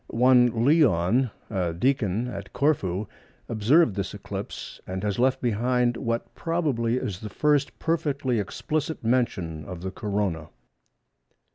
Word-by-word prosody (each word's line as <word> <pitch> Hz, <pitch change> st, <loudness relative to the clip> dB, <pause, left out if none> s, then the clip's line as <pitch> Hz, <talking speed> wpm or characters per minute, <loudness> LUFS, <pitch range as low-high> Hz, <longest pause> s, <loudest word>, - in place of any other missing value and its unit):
One 120 Hz, -1 st, +4 dB
Leon, 125 Hz, -, +4 dB, 0.2 s
a 90 Hz, -5 st, -1 dB
deacon 115 Hz, 0 st, +1 dB
at 100 Hz, -4 st, -7 dB
Corfu, 105 Hz, -, +1 dB, 0.4 s
observed 115 Hz, -, +3 dB
this 100 Hz, -2 st, -3 dB
eclipse, -, -, -7 dB
and 95 Hz, +1 st, -4 dB
has 105 Hz, 0 st, -1 dB
left 130 Hz, +1 st, +2 dB
behind 120 Hz, +1 st, +1 dB
what 115 Hz, -1 st, -3 dB
probably 145 Hz, -9 st, 0 dB
is 100 Hz, -7 st, -3 dB
the 105 Hz, -, -6 dB
first 145 Hz, +5 st, +1 dB
perfectly 145 Hz, -7 st, 0 dB
explicit 150 Hz, +10 st, -3 dB
mention 95 Hz, -10 st, 0 dB
of 90 Hz, +3 st, -8 dB
the 95 Hz, +1 st, -4 dB
Corona. 100 Hz, -7 st, -2 dB
115 Hz, 125 wpm, -26 LUFS, 100-130 Hz, 0.4 s, One